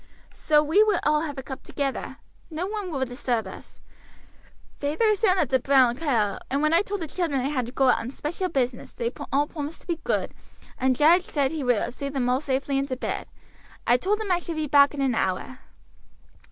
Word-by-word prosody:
So 300 -1 +3
we 320 +8 +4
will 425 -4 +3
all 300 0 +3
have 295 -3 -5
a 265 - -5
cup 265 0 -7
together. 275 -2 -4 0.3
No 325 +2 -3
one 410 -1 -4
will 270 -5 -1
disturb 245 -3 -2
us. 190 - -11 1.0
Feyther 295 +8 -1
is 425 -2 +2
down 385 -4 +4
at 300 - +1
the 260 - +3
'Brown 260 -2 +4
Cow,' 240 -9 0
and 280 +3 0
when 305 +1 +3
I 335 - +5
told 410 -1 -4
the 325 - -3
children 315 -4 -1
I 260 +2 -1
had 255 -5 -1
to - - -7
go 270 0 +2
out - - +4
on 230 - -5
special 335 +7 -3
business 255 -5 -2
they 235 0 -2 0.2
all 285 +2 +3
promised 300 0 -6
to - - -23
be 340 -2 -2
good, - - -1 0.5
and 260 0 +2
Jarge 325 +7 +5
said 285 -6 -1
he 315 -3 -3
would 245 -1 +1
see 280 +2 -4
them 265 -3 -1
all 255 +2 +1
safely 275 -1 -1
into 275 -2 -2
bed. - - -4 0.6
I 240 - +5
told 405 - 0
him 425 -3 -3
I 350 - +3
should 335 -1 -6
be 310 -1 -1
back 285 0 +5
in 280 - -3
an 265 -2 +2
hour." 205 +5 -2
285 Hz, 220 wpm, -25 LUFS, 255-325 Hz, 1.0 s, I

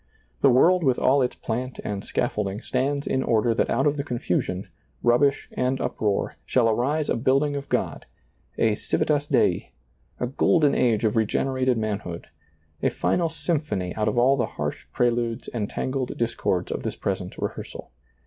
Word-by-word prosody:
The - - +6
world 175 +8 +5
with 130 -4 +3
all 135 +2 +3
its 125 - 0
plant 125 +3 -4
and 100 -1 -4
scaffold 100 - -1
ing 100 +4 -6
stands 140 +3 -1
in 130 - 0
order 115 -1 +2
that 115 - 0
out 135 +4 +1
of 145 0 +2
the 140 - -1
confusion, 95 - -2 0.4
rubbish 135 +4 +3
and 130 +1 0
uproar 105 -2 -1
shall 125 -3 +2
arise 135 +7 +1
a - - +1
building 135 +4 +2
of 140 0 -5
God, - - -2 0.5
a 110 -2 +3
civitas 145 +7 0
Dei, - - +1 0.5
a - - 0
golden 145 +3 +3
age 115 -3 +2
of 105 - +1
regenerated 130 +3 +1
manhood, 100 -6 -3 0.6
a - - +3
final 170 -2 0
symphony 150 - -2
out 110 - -1
of - - 0
all 130 +3 +5
the 125 - 0
harsh - - -4
preludes 120 -1 0
and 105 -4 -3
tangled 130 -1 -3
discords 115 -6 -1
of - - -2
this - - -3
present - - -3
re - - -1
hearsal. - - -9
125 Hz, 170 wpm, -25 LUFS, 110-140 Hz, 0.6 s, The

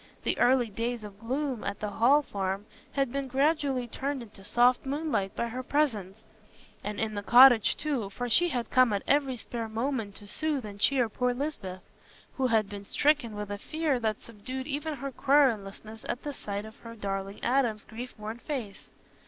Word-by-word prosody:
The - - 0
early 245 -2 +4
days 230 +2 -2
of 205 -1 -10
gloom 260 +1 -2
at 200 0 -3
the 210 -1 -3
Hall 265 +8 +4
Farm 195 -3 -3 0.3
had 275 -3 0
been 275 0 -2
gradually 275 -1 +1
turned 275 +2 -3
into 205 -3 -14
soft 245 +4 +3
moonlight 275 -8 -1
by 235 - -1
her 250 +3 -4
presence; 220 -8 -1 0.6
and 210 0 -4
in 220 -1 -1
the 205 - -3
cottage, 245 +1 +7
too, 275 -9 -2
for 245 +5 -4
she 345 +9 +4
had 245 -6 -3
come 255 -4 +5
at 200 - -1
every 275 -3 +2
spare 230 0 -5
moment 225 -2 -2
to 205 - -9
soothe 295 +1 -1
and 205 -1 -8
cheer 255 +2 +3
poor 250 +2 0
Lisbeth, 200 -10 -4 0.5
who 265 -1 +2
had 220 -3 +2
been 200 0 -7
stricken 280 0 +1
with 210 -1 -5
a 205 - -4
fear 310 0 -1
that 220 -2 -2
subdued 255 +4 -6
even 300 +2 -3
her 275 +1 -5
querulousness 225 -6 +1
at 245 - -3
the 290 - -4
sight 205 -4 -5
of 220 +1 -12
her 230 0 -10
darling 195 -1 -4
Adam's 240 -4 +1
grief 245 +3 -8
worn 215 +2 -6
face. 240 -9 -6
240 Hz, 185 wpm, -29 LUFS, 210-275 Hz, 0.6 s, cottage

